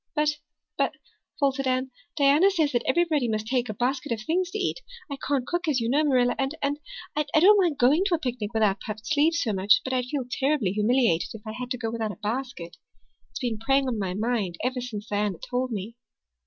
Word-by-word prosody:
"But 300 0 +1 0.4
but," - - +2 0.5
faltered 275 -2 +1
Anne, 255 0 0 0.2
"Diana 290 +6 +5
says 320 -7 +1
that 240 - +1
everybody 310 -3 +2
must 215 -1 -1
take 245 0 0
a - - -2
basket 260 +4 -1
of 230 - 0
things 345 +10 0
to 425 - -4
eat. 395 +4 -1 0.3
I 280 - -3
can't 275 -3 +1
cook, 345 +4 -2
as 285 -5 +2
you 230 - -1
know, 290 +5 +3
Marilla, 250 -4 +3
and 270 +3 -1
and 285 0 -1 0.4
I 300 - +2 0.2
don't 405 +5 +7
mind 335 -6 +1
going 275 +8 +4
to 370 -4 +3
a - - -1
picnic 245 -7 -3
without 215 -3 +2
puffed 215 0 -7
sleeves 305 +3 +2
so 225 -8 0
much, 195 +3 +4
but 260 - -3
I'd 250 -1 0
feel 265 0 -3
terribly 265 -5 0
humiliated 210 -4 +2
if 215 - -11
I 215 - -5
had 250 +2 -6
to 250 - -2
go 225 -2 -3
without 225 -2 -2
a - - -11
basket. 215 -5 -5 0.5
It's - - -8
been 235 -4 -2
preying 270 +3 +2
on 235 -4 -1
my 185 -2 -2
mind 215 -4 -1
ever 255 0 -1
since 215 -4 -6
Diana 205 -3 -1
told 250 0 -1
me." 215 +2 -5
255 Hz, 220 wpm, -26 LUFS, 220-290 Hz, 0.5 s, don't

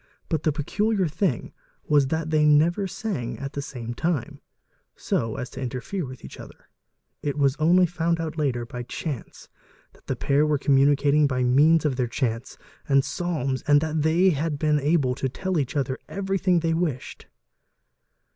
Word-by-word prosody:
But 160 -3 0
the 155 - +1
peculiar 195 +6 0
thing 155 - -2 0.3
was 145 -3 +3
that 160 +2 -2
they 155 -1 +3
a 160 +6 +3
sang 190 - -4
at 140 0 -6
the 140 - -3
same 120 -4 -6
time 160 +1 -2 0.5
so 115 -1 -2
as 125 - -5
to - - -8
interfere 130 +7 -4
with 130 -1 -10
each - - -11
other: - - -13 0.5
it 145 0 -2
was 140 -2 +2
onl 175 +3 +4
found 170 0 -1
out 160 -1 -4
later 130 -6 -1
by 125 0 -7
chance 130 +2 -6 0.5
that - - -25
the - - -1
pair 140 +2 +2
were 150 -1 +2
communicating 145 +2 +3
by 130 -2 -1
ne 145 +7 +5
their 135 -6 -1
chants 115 0 -3 0.3
and 140 -1 +4
psalms 140 -4 -2
and 145 0 +6
that 155 -1 -1
they 170 +5 +4
had 150 0 -1
been 150 0 +2
able 145 -3 +2
to 130 +1 -2
tell 185 +5 -2
each 130 -1 -3
othe 135 -2 0
everything 195 -3 0
they 165 0 +1
wished. 160 -7 -3
150 Hz, 170 wpm, -25 LUFS, 135-165 Hz, 0.5 s, and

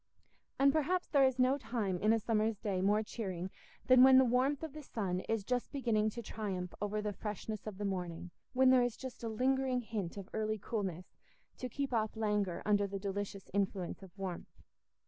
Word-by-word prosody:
And 275 0 +5
perhaps 345 +4 +1
there 280 -2 +5
is 260 -1 +2
no 260 +2 +3
time 210 -8 -2
in 215 +3 +3
a 225 - +4
summer's 220 -1 +1
day 195 -3 -1
more 205 +3 +3
cheering 190 -5 -4 0.3
than 255 -1 +7
when 260 0 +9
the 260 - +7
warmth 260 +5 +2
of 315 -4 -5
the 305 - -7
sun 195 -9 -2
is 225 -2 0
just 245 +3 -1
beginning 230 -6 +1
to 235 +2 -7
triumph 190 -5 -4
over 210 +1 -1
the 210 -1 -2
freshness 210 +1 -5
of 205 -3 -5
the 205 - -3
morning—when 185 +7 0
there 255 -1 +6
is 245 -1 0
just 260 -2 -8
a 230 - -2
lingering 255 +2 +1
hint 210 -6 -4
of 195 -2 -6
early 215 0 -1
coolness 190 -5 -4 0.5
to 255 - -4
keep 275 +1 -3
off 220 -1 0
languor 210 -5 0
under 205 -1 +3
the 195 0 -4
delicious 200 0 -4
influence 195 -3 -1
of 190 - -11
warmth. 190 -3 -6
215 Hz, 195 wpm, -34 LUFS, 195-255 Hz, 0.5 s, when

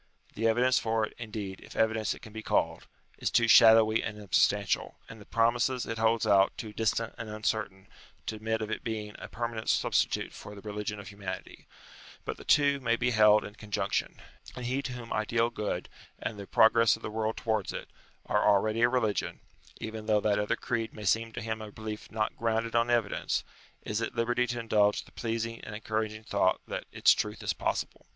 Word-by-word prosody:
The 115 +2 0
evidence 125 +3 +3
for 110 -1 +1
it, - - -12
indeed, 105 -4 -5
if - - -13
evidence 110 -1 +1
it - - -16
can 110 -2 -11
be 110 - -5
called, - - 0 0.3
is - - 0
too 115 -1 +3
shadowy 110 -1 +7
and 105 -1 -5
unsubstantial, 100 -4 +1
and 110 -2 -11
the - - -13
promises 120 +2 +1
it 115 0 -4
holds 115 0 +2
out 100 -2 +4
too 110 -2 -6
distant 115 +1 0
and 110 - -5
uncertain, 105 -3 -2 0.4
to - - -3
admit 110 0 -1
of 110 - -5
its - - -2
being 110 -2 -4
a - - -7
permanent 115 -1 -4
substitute - - +1
for 105 - -10
the 100 - -10
religion 105 0 -4
of 100 -2 -9
humanity; 100 -2 -7 0.6
but - - -4
the - - -11
two 140 -1 +4
may 115 -3 +1
be 120 +2 0
held 105 -1 +5
in 105 - -8
conjunction: 105 -1 -2 0.4
and 125 - -6
he 130 +3 0
to 130 -2 -5
whom 120 -2 -6
ideal 115 +2 +1
good, 105 - -3 0.3
and 105 - -5
the 100 - -8
progress 115 0 +5
of - - -15
the - - -4
world 110 0 -2
towards 110 -4 -1
it, - - -6 0.4
are - - +1
already 110 +3 +3
a 120 - +5
religion, 110 -5 0 0.4
even 110 -1 -6
though 105 -1 +4
that 105 0 +1
other 105 - 0
creed 115 -2 -3
may 105 - -7
seem 115 +3 +2
to 115 +1 -6
him 110 0 -3
a 105 -1 -8
belief 110 0 -7
not 110 0 -1
grounded 115 0 -1
on 115 +1 +3
evidence, 115 -4 0 0.4
is 105 +1 -2
at 115 - -3
liberty 120 +1 +1
to 120 0 -3
indulge 105 -3 +2
the - - -18
pleasing 115 0 -3
and 105 - -7
encouraging 110 0 -3
thought, - - +1
that - - -4
its - - +5
truth - - -3
is - - 0
possible. - - -3
110 Hz, 200 wpm, -29 LUFS, 105-115 Hz, 0.6 s, shadowy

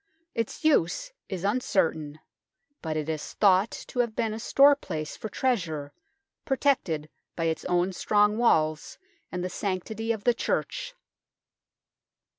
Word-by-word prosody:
Its 230 +6 -3
use 310 - +2 0.2
is 190 -2 -4
uncertain, 160 -9 0 0.6
but 155 -2 -2
it 155 -1 -2
is 155 -2 -4
thought 195 +1 +4
to 250 - -7
have 235 -3 +1
been 225 -2 0
a 220 - -5
storeplace 275 - +3
for 220 - -6
treasure, 165 - -1 0.5
protected 260 - +1 0.3
by 165 - -2
its 160 -1 -1
own 180 +1 +1
strong 210 +3 +3
walls 155 -9 +2 0.3
and 180 -1 -3
the - - -1
sanctity 210 +4 -3
of 220 -3 -3
the 245 - +4
Church. - - -2
200 Hz, 130 wpm, -27 LUFS, 160-235 Hz, 0.6 s, thought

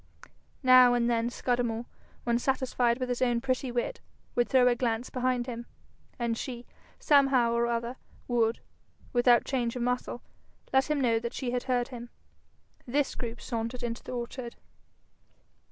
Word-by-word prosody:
Now 255 -1 +7
and 235 -1 +2
then 235 0 +1
Scudamore, 240 -2 -1 0.4
when 235 0 +1
satisfied 255 -2 +1
with 255 - -2
his 245 -1 -2
own 240 -2 +2
pretty 255 +1 -1
wit, 245 - -2 0.3
would 240 0 +1
throw 255 -2 +5
a 245 - +5
glance 240 -1 -2
behind 250 -1 0
him, 240 -1 -6 0.5
and 235 -2 -1
she, 240 0 -6 0.3
somehow 270 -5 +4
or 235 0 +2
other, 235 +1 -2 0.3
would, 235 -2 +1 0.5
without 240 -1 +5
change 245 -3 -1
of 245 - -2
muscle, 250 0 -2 0.5
let 265 +2 +3
him 300 -1 +1
know 230 -4 +2
that 235 +1 -5
she 250 -3 -2
had 245 0 -2
heard 245 -2 0
him. 240 -2 -8 0.8
This 280 +3 0
group 235 -1 -5
sauntered 230 +1 -4
into 235 0 -3
the - - -7
orchard. 240 0 -5
245 Hz, 155 wpm, -29 LUFS, 235-255 Hz, 0.8 s, Now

